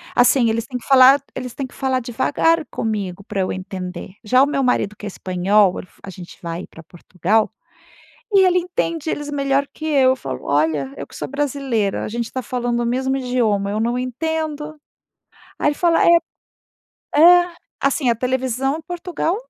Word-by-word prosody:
assim, 245 -1 +4
eles 225 +1 -1
têm 255 -1 -5
que 235 - -12
falar 270 +1 +7 0.2
eles 250 -2 -5
têm 275 - -4
que - - -20
falar 260 -1 0
devagar 300 +7 +1
comigo, 200 -4 -3
para 200 -2 -3
eu 185 - -1
entender. 185 -1 -6
Já 255 +5 +4
o - - +5
meu 280 -2 -1
marido 210 -5 0
que 205 - -10
é - - -3
espanhol 190 +1 +1
el - - -9 0.2
a 195 - -8
gente 175 -1 -11
vai 170 +1 -5
pra 165 - -14
Portugal 185 +6 -1 0.8
e 390 -1 +6
ele 360 0 +3
entende 335 -3 -2
eles 295 0 -4
melhor 280 -1 0
que 315 - -10
eu, 270 -4 +4
eu 260 - +1
falo: 130 - -6
“Olha, 145 -2 0
eu 140 - -7
que - - -17
sou - - -5
brasileira, 270 -7 -1
a - - -4
gente 235 +1 -3
está 260 +2 -5
falando 245 -2 -2
o 240 - -1
mesmo 260 +2 0
idioma, 230 -6 0
eu 215 - -1
não 235 +2 0
entendo”, 305 +3 -3 0.8
Aí - - +1
ele 295 - -2
fala 335 0 +2
é - - +4 1.1
é 350 +2 +7 0.3
assim 275 -2 +1
a 235 - +3
televisão 260 +4 -1
Portugal 350 +1 -3
250 Hz, 185 wpm, -20 LUFS, 205-285 Hz, 1.1 s, falar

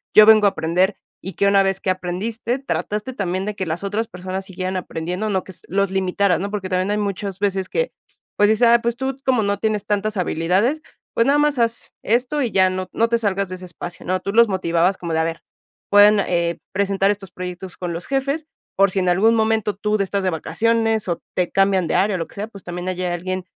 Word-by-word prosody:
yo 215 - +10
vengo 215 -1 +7
a - - +6
aprender, 180 +5 0 0.3
y 190 - -6
que 200 - +1
una 200 0 +5
vez 195 0 0
que 190 - +1
aprendiste 215 +7 -3
trataste 215 -2 -3
también, 190 -4 -2
de 210 - -3
que 190 - -3
las 165 +4 -3
otras 215 +3 -1
personas 185 0 -5
siguieran 185 -1 -4
aprendiendo, 180 +3 -3
no 190 -2 0
que - - -10
s - - -7
los 195 +1 +1
limitaras, 190 -1 +1
¿no? 200 +1 -3
Porque, 200 -3 -3
también 185 +2 0
hay 210 - +1
muchas 200 -1 -3
veces 195 -2 -1
que, 485 +1 -1 0.4
pues, 205 0 +4
dices, 220 +2 +4
ah, 235 0 +6
pues, 235 0 -1
tú 265 0 -2
como 255 -4 +2
no 200 0 0
tienes 210 -2 -1
tantas 210 +1 -1
habilidades, 185 - +1 0.3
pues, 230 - +2
nada 285 +1 +4
más 295 -3 +2
haz 230 0 0
esto 250 +6 +1
y 245 -4 -1
ya, 190 -1 +4
no 185 0 -4
no 230 - +2
te 235 - +3
salgas 200 -3 -1
de 185 - -5
ese 185 0 -9
espacio, 175 0 -8
¿no? 185 +1 0
Tú 200 +2 -4
los 235 0 +6
motivabas 180 0 +1
como 170 -2 -4
de, 160 - +1
a - - +2
ver, 165 0 -4 0.5
pueden, 205 0 +7
eh, 170 -1 0
presentar 195 0 +2
estos 195 -3 -6
proyectos 180 0 -7
con 175 -2 -4
los 170 +1 -6
jefes, 275 +3 -1 0.3
por 195 +1 +4
si 195 - -3
en 180 -1 +1
algún 220 +6 +4
momento 220 -2 +1
tú 210 +2 0
de 200 - +1
estás 195 0 -2
de 185 - +2
vacaciones, 225 +6 0
o 170 - -2
te 180 -1 0
cambian 195 -3 +2
de - - -1
área 195 +2 +2
o 180 - -2
lo 165 - -3
que - - -19
sea, 205 +2 -4
pues, 200 -4 -13
también 175 +1 -6
hay 185 0 -3
alguien 180 +1 -3
195 Hz, 240 wpm, -21 LUFS, 185-215 Hz, 0.5 s, yo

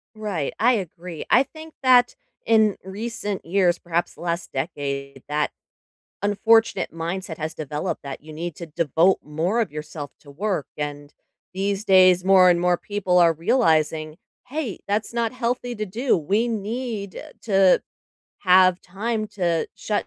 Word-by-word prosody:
Right, 200 -9 -3
I 245 +3 +5
agree, 180 -5 -5
I 255 - +6
think 315 +2 -12
that 250 -1 +5 0.3
in 220 -2 +4
recent 205 +1 -5
years- 175 0 +2
perhaps 170 0 -2
the - - -14
last 170 0 -3
decade- 140 -2 -4
that 150 0 0 0.7
unfortunate 225 +3 +3
mindset 165 +1 -4
has 160 +1 -4
developed 150 -1 -4
that 140 -1 -7
you 155 +1 -11
need 170 +1 -5
to 170 - -7
devote 165 +4 +2
more 165 +10 -1
of 220 - -2
yourself 150 -1 -7
to 145 - -15
work 180 -1 -2
and, 145 0 -5 0.4
these 195 +2 -2
days, 185 -2 +5
more 190 -1 +6
and 175 -1 +4
more 180 0 +3
people 190 -3 0
are 170 -2 +6
realizing, 160 - +1 0.3
“Hey, 270 - -4
that's 205 +2 -1
not 235 -1 -1
healthy 245 0 -2
to 215 -1 -3
do, 235 +7 0
we 200 +9 0
need 220 -2 -4 0.2
to 195 -4 +4 0.6
have 185 -1 +5
time 215 +4 -3
to 175 -5 -1
shut 210 -1 -2
185 Hz, 150 wpm, -23 LUFS, 160-215 Hz, 0.7 s, I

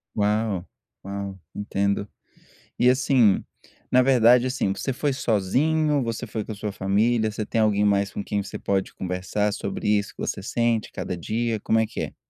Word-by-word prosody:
Uau, 105 -3 0 0.4
uau 100 -1 -5 0.2
entendo. 100 0 -1 0.7
E 125 - +4
assim, 125 -5 +4 0.5
na 130 0 +5
verdade, 125 -1 +5
assim, 125 -6 0
você 130 +7 -3
foi 140 +2 -1
sozinho, 140 +7 +1
você 115 +1 -3
foi 110 0 -4
com 110 - -6
a - - -5
sua 105 0 -4
família, 110 +4 +1
você 110 0 -4
tem 115 - 0
alguém 105 -1 +3
mais 100 0 +2
com - - -4
quem 100 0 -2
você 100 - -7
pode 95 -1 -1
conversar 95 +3 -2
sobre - - -3
isso 105 -1 +1
que - - -12
você 100 - -3
sente 115 +1 0
cada 90 - -4
dia, 110 +5 -2
como 110 +2 +2
é 110 - +2
que - - -6
é? - - -6
105 Hz, 180 wpm, -24 LUFS, 100-120 Hz, 0.7 s, na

